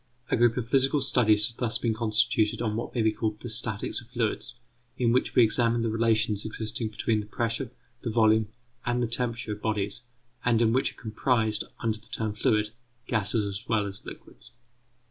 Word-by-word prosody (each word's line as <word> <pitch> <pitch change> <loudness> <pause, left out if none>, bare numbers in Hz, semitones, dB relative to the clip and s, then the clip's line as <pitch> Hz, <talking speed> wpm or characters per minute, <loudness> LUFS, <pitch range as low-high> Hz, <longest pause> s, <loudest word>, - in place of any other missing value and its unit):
A - - +4
group 120 0 +3
of 120 -2 -2
physical 135 +3 +3
studies 110 -6 +3
has 115 - -3
thus 115 -1 +1
been 115 -2 0
constituted 110 -1 +1
on 110 -3 -1
what 115 +3 -4
may 115 - +2
be 110 - +4
called 110 -1 -2
the 120 - -7
statics 110 0 -2
of 120 - -16
fluids, 120 0 -1 0.4
in 120 -2 +2
which 125 +2 +1
we 125 - +7
examine 115 +1 +3
the 115 - 0
relations 110 -2 +2
existing 110 0 -3
between 110 0 0
the 105 - -6
pressure, 115 +3 -1 0.3
the 120 - -3
volume, 110 -1 +4 0.4
and 120 0 0
the - - +1
temperature 115 -2 -2
of 105 0 -5
bodies, 105 0 -2 0.4
and 120 -2 +3
in 115 -1 +3
which 130 +2 +1
are - - -19
comprised, 110 -1 0 0.2
under 110 -1 0
the 110 - -19
term 110 -2 -3
fluid, 105 0 +1 0.3
gases 110 -2 0
as 100 +2 -6
well 110 -3 +2
as 100 -1 -5
liquids. 120 - -9
115 Hz, 195 wpm, -27 LUFS, 110-120 Hz, 0.4 s, we